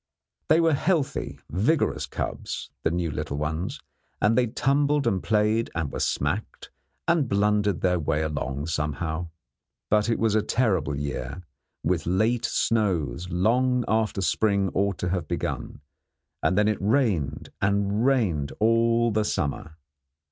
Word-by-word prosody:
They 160 - +5
were 165 -1 +3
healthy, 155 0 0
vigorous 115 - +1
cubs, - - -5
the - - +1
new 85 -1 -1
little 70 +1 -4
ones, 80 - -3 0.4
and 105 +2 +3
they 125 0 +3
tumbled 140 +4 +1
and 95 -2 +1
played 110 +1 +1
and 80 -4 -2
were - - -3
smacked, 75 +10 -2 0.4
and 165 -7 +2
blundered 105 -1 +2
their 90 -1 +2
way 75 0 0
along 70 -2 -3
somehow. 80 +1 -2 0.6
But 105 +1 +3
it 115 - +2
was 110 -2 +1
a 110 - +3
terrible 95 - +1
year, 70 +3 -4 0.4
with - - 0
late 110 +6 +1
snows 90 - 0
long 120 +8 +2
after 110 -2 +1
spring 100 0 +1
ought 100 -1 0
to 90 - -2
have 90 -3 -2
begun; - - -4 0.6
and 90 - +1
then 105 0 +4
it 110 -3 0
rained 105 - +1
and 100 +2 +1
rained 105 - +1
all 115 +1 +3
the 110 0 +1
summer. 80 -4 -2
100 Hz, 140 wpm, -26 LUFS, 80-115 Hz, 0.6 s, They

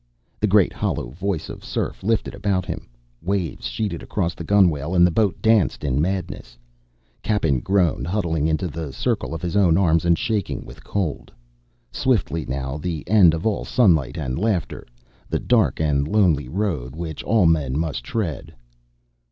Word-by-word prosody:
The - - +2
great - - +4
hollow - - -2
voice 95 +3 -3
of - - -9
surf - - -3
lifted 110 +2 0
about 100 -2 -1
him, - - -6 0.3
waves 90 -8 -2
sheeted 85 - -3
across 90 -5 -2
the - - -8
gunwale 85 -4 +2
and 90 0 +6
the 90 - +2
boat 100 +1 +1
danced 110 -8 +3
in 70 0 +1
madness. 90 -9 -3 0.6
Cappen 80 -11 +1
groaned, 90 -2 +1
huddling 85 -5 0
into 80 +3 0
the 80 -2 -5
circle - - -1
of 80 - -7
his 90 +1 -2
own 90 -5 +4
arms 85 -4 +3
and 85 -1 +3
shaking 110 -5 -2
with - - -13
cold. 95 -8 -3 0.6
Swiftly, 85 - 0
now, 65 +1 -3
the 80 -2 -4
end 95 -6 +6
of 80 - -5
all 110 -2 0
sunlight 80 - +2
and 65 -5 -3
laughter, 105 -5 -1 0.4
the - - 0
dark - - +2
and 75 -2 +1
lonely 80 -10 +2
road 75 -8 -2
which 80 -1 -5
all 110 -4 +2
men 75 -5 +2
must 75 -7 -2
tread. 85 - -4
85 Hz, 165 wpm, -22 LUFS, 75-100 Hz, 0.6 s, and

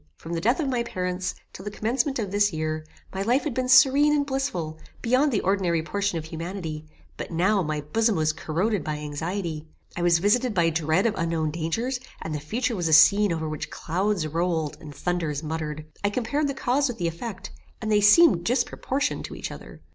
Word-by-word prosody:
From 165 - -8
the 165 - -2
death 240 - +2
of 305 - 0
my 250 -3 0
parents, 180 -5 -3 0.2
till 190 - -9
the 205 - -4
commencement 250 +7 -1
of 205 -5 -3
this 205 0 +3
year, 155 -1 -2 0.3
my 190 - -3
life 245 +7 +2
had 300 - -2
been 255 +1 -1
serene 275 +3 +6
and 285 -1 +1
blissful, 265 - -3 0.2
beyond 255 +5 +3
the 215 - +1
ordinary 180 -4 +1
portion 200 +1 -1
of 160 - -5
humanity; 160 -1 -6 0.3
but, - - -5
now, 190 +5 +2
my 155 -3 -2
bosom 220 +9 +1
was 155 -1 +1
corroded 175 +5 -1
by 150 0 -3
anxiety. 160 +2 -4 0.3
I 175 - -3
was 175 -1 +4
visited 210 +5 +2
by 170 -2 +3
dread 160 +4 +1
of 225 - +2
unknown 165 -2 0
dangers, 225 - -2 0.2
and 160 - -5
the 150 - -2
future 230 - -2
was 175 -4 -1
a 160 - +2
scene 200 +6 +6
over 160 -1 -2
which 155 -1 -5
clouds 185 +1 -1
rolled, 165 -1 -1
and 150 -3 -10
thunders 165 -4 -2
muttered. 155 -1 -4 0.2
I 205 - +3
compared 255 +7 -1
the 275 - -3
cause 270 +2 +1
with 245 -3 -5
the 175 - -1
effect, 190 +3 -6 0.3
and 220 -1 -3
they 210 -1 +4
seemed 210 - +6
disproportioned 250 +4 -1
to - - -8
each - - -5
other. - - -11
185 Hz, 205 wpm, -25 LUFS, 160-235 Hz, 0.3 s, serene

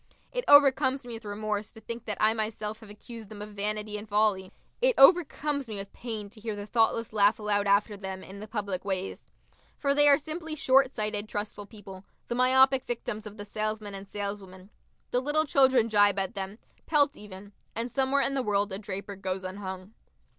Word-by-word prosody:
It - - -2
overcomes 275 -2 +5
me 240 - -7
with 225 -1 -9
remorse 210 0 -3
to 220 - -12
think 230 +1 -7
that 210 -2 -3
I 215 +1 +4
myself 215 -1 -3
have 220 -2 -14
accused 220 +1 -11
them 215 - -10
of 210 +1 -7
vanity 210 +1 -3
and 210 0 -11
folly. 205 -3 +1 0.3
It - - +3
overcomes 290 -3 +4
me 215 - -5
with 195 0 -6
pain 220 -4 -6
to 220 - -14
hear 215 -1 -4
the 205 0 -6
thoughtless 225 0 +1
laugh 205 0 +4
aloud 205 -1 0
after 205 +1 +3
them, 190 -1 -6
in 195 +1 -10
the 215 - -8
public 200 -4 -3
ways. 190 -1 -4 0.5
For 280 -1 +1
they 290 +1 +5
are 280 - +7
simply 315 +1 -6
short 270 -2 +4
sighted 215 -3 -3
trustful 205 -1 -5
people, 195 -3 -11 0.3
the - - -1
myopic 260 +1 +4
victims 230 -2 -4
of 210 +1 -11
the 205 - -7
salesman 215 0 -3
and 195 0 -8
saleswoman. 200 -1 -6 0.4
The 250 - +1
little 300 +3 +1
children 265 -5 +4
gibe 205 -2 +4
at 190 -1 -1
them, 195 +1 -5 0.3
pelt 290 -1 +3
even.... 205 -1 -11 0.2
And 235 +2 -3
somewhere 270 +2 +2
in 275 - 0
the 270 - 0
world 205 -2 0
a 190 - -4
draper 200 -1 -6
goes 190 0 -4
unhung. 190 +1 -7
215 Hz, 195 wpm, -28 LUFS, 205-250 Hz, 0.5 s, are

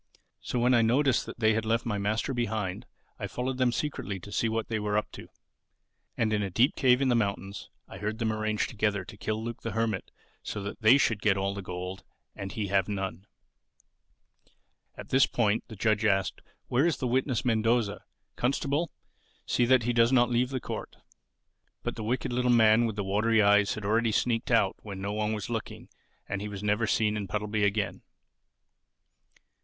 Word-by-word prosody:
So - - -4
when 125 +1 +3
I 120 - +5
noticed 130 +4 +2
that - - -8
they 110 -1 +3
left 115 +2 0
my 105 -4 -1
master 110 +6 -1
behind, 110 -6 -2 0.3
I - - -3
followed 130 +1 -3
them 125 -1 +3
secretly 120 -8 -3
to 100 - -10
see 110 +2 0
what 110 0 -2
they 110 -1 -2
were 105 0 0
up 105 - -2
to. - - -10 0.9
And 110 -2 +1
in 105 - +1
a 100 - -2
deep 120 - +3
cave 130 0 +4
in 135 - +2
the 120 - +3
mountains 100 -2 -2 0.2
I - - -10
heard 105 +1 -3
them 110 -2 0
arrange 110 -1 0
together 105 -3 -1
to 110 - -11
kill 110 +2 -3
Luke 115 0 -6
the 115 - -4
Hermit 110 -4 -1 0.3
so 105 - -5
that 100 +3 -6
they 110 +5 +7
should 115 -6 +1
get 105 -3 +3
all 100 +1 -1
the 100 - -5
gold 90 0 -6 0.3
and 95 -1 -6
he 105 - -3
have 95 -1 +2
none." 95 -1 -4 1.7
At - - -10
this 135 +1 +4
point 110 -2 +1
the 110 - -9
judge 110 +1 +1
asked, 95 -3 +1 0.2
"Where 135 +7 +2
is 170 - 0
the 130 - -3
witness 130 0 0
Mendoza? 115 -2 +1 0.3
Constable, 140 +5 0 0.6
see 120 - +2
that 130 0 +4
he 120 +2 0
does 115 +1 +4
not 120 -2 +4
leave 125 +1 +2
the 130 -1 -2
court." - - -6 0.9
But - - -3
the 110 - -5
wicked 120 +2 -1
little 125 0 +1
man 115 -1 +5
with 110 - -4
the 105 - -2
watery 105 +3 +2
eyes 105 0 +4
had 110 -2 -6
already 115 +2 +2
sneaked 115 +2 0
out 115 -5 +3
when 100 -3 -7
no 100 +1 -3
one 105 0 -1
was 105 -2 -4
looking 115 -2 -5 0.4
and 100 0 -3
he 105 - -4
was 100 0 -7
never 105 +2 +1
seen 105 -1 +1
in 105 -2 -3
Puddleby 105 +2 -1
again. 100 0 0
110 Hz, 195 wpm, -28 LUFS, 105-120 Hz, 1.7 s, they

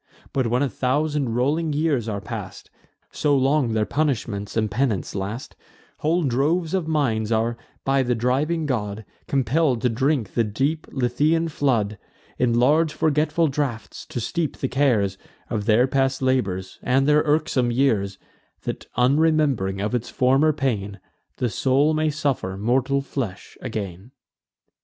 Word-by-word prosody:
But, 130 -3 +1
when 125 +4 +1
a - - +2
thousand 140 -1 0
rolling 150 +6 +1
years 145 -7 0
are 100 -2 -2
past, - - -7 0.4
(So 145 -2 +2
long 135 -2 +2
their 110 -1 +1
punishments 115 -9 -2
and 110 -2 +1
penance 115 -4 -1
last,) 100 +6 -5 0.4
Whole 165 +3 +1
droves 155 +6 +1
of 185 -4 0
minds 120 -9 0
are, 115 +1 +1 0.3
by 135 0 +3
the 125 -1 +1
driving 140 +8 0
god, 110 -6 -2 0.2
Compell'd 135 0 +1
to 125 - +3
drink 130 -1 0
the 115 - +2
deep 135 +9 -1
Lethaean 150 +6 +1
flood, 115 - 0 0.4
In 120 -2 +2
large 150 +5 +4
forgetful 155 +1 +1
draughts 135 -6 -4
to - - -4
steep 155 - -2
the 135 - -1
cares 115 -9 +1 0.3
Of 105 -2 -1
their 115 +3 +5
past 135 0 +1
labours, 100 -8 -1
and 135 +2 +2
their 150 0 +5
irksome 145 -5 +1
years, 110 -7 +1 0.5
That, - - -5
unrememb'ring 135 -7 +2
of 105 +4 -2
its 120 -1 -1
former 135 +5 +3
pain, 110 -9 -2 0.4
The 125 - 0
soul 140 +7 +2
may 155 0 +1
suffer 140 -10 -2
mortal 130 +6 +1
flesh 120 -8 -5
again." 100 -4 -5
130 Hz, 145 wpm, -23 LUFS, 110-150 Hz, 0.5 s, their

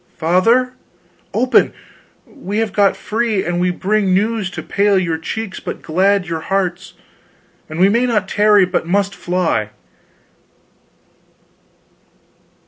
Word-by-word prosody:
Father! 225 +10 +2 0.6
Open 255 +1 +2 0.5
we 210 -8 -6
have 225 -1 -1
got 200 -1 +2
free, 220 -3 -1
and 175 0 -1
we 180 - +2
bring 190 +1 0
news 210 0 0
to - - -7
pale 200 0 +1
your 165 -4 -1
cheeks 200 +4 -5
but - - -7
glad 190 +4 +1
your 165 -2 -3
hearts; 190 +1 -3 0.7
and 155 +2 -6
we 185 - +6
may 235 +5 +2
not 230 -3 0
tarry, 210 -2 +4
but 180 -2 -2
must 200 +2 0
fly! 180 - -1
195 Hz, 125 wpm, -17 LUFS, 180-215 Hz, 0.7 s, we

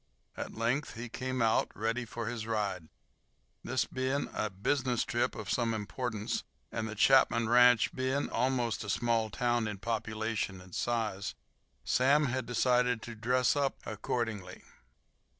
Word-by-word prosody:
At - - -6
length 120 +6 -1
he 115 +1 -6
came 130 0 -2
out, 110 -1 +3
ready 115 +3 -1
for 115 +1 -5
his 115 -1 -4
ride. 100 -7 -2 0.7
This - - 0
being 130 +2 -1
a 110 - -1
business 125 +5 0
trip 120 0 0
of 110 -3 -6
some 115 0 +1
importance, 110 0 -3 0.3
and 110 -1 -3
the 110 - -6
Chapman 115 -1 +4
ranch 125 -1 +6
being 130 +2 0
almost 120 -3 0
a 100 - -6
small 115 0 +1
town 120 0 0
in 105 -1 -4
population 110 -2 -2
and 90 -1 -14
size, 105 - -1 0.5
Sam 140 +4 +4
had 130 -1 -2
decided 125 -1 +2
to 120 - -6
"dress 125 +4 +2
up" 140 -1 +1
accordingly. 110 -3 -3
115 Hz, 145 wpm, -31 LUFS, 110-125 Hz, 0.7 s, ranch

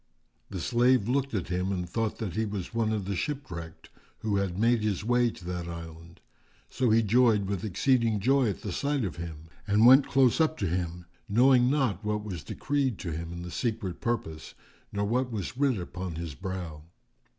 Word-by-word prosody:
The 95 - -5
slave 120 +1 +3
looked 135 0 0
at 95 -4 -2
him 90 +1 -1
and 90 -2 -2
thought 110 +4 -2
that 105 -6 -4
he 110 - 0
was 100 -3 -4
one 115 -1 +1
of 105 -3 -2
the 100 0 -2
shipwrecked, 85 - -5 0.3
who 105 -2 0
had 95 -2 -1
made 115 +2 +3
his 105 -3 -1
way 120 0 +3
to 90 - -11
that 90 -1 -4
island; 85 0 -9 0.5
so 130 -2 +1
he 115 +1 +4
joyed 110 -1 +4
with 95 -2 -3
exceeding 115 +1 +2
joy 130 +3 +3
at 100 - -5
sight 140 +7 -1
of 85 -6 -5
him 80 -2 -7 0.2
and 105 +2 +4
went 130 +3 +8
close 135 +2 +3
up 160 0 +2
to - - -1
him, 90 0 -3 0.2
knowing 125 +3 +5
not 130 - 0
what 105 0 -1
was 95 -7 -6
decreed 135 -6 -1
to 85 - -5
him 85 +2 -5
in 85 0 -6
the 90 - -7
Secret 110 -7 -3
Purpose 80 -10 -3 0.4
nor 100 0 -1
what 125 +4 0
was 105 0 -4
writ 135 -3 +2
upon 90 -1 -5
his 85 -2 -5
brow. 90 -2 -6
105 Hz, 195 wpm, -28 LUFS, 90-120 Hz, 0.5 s, went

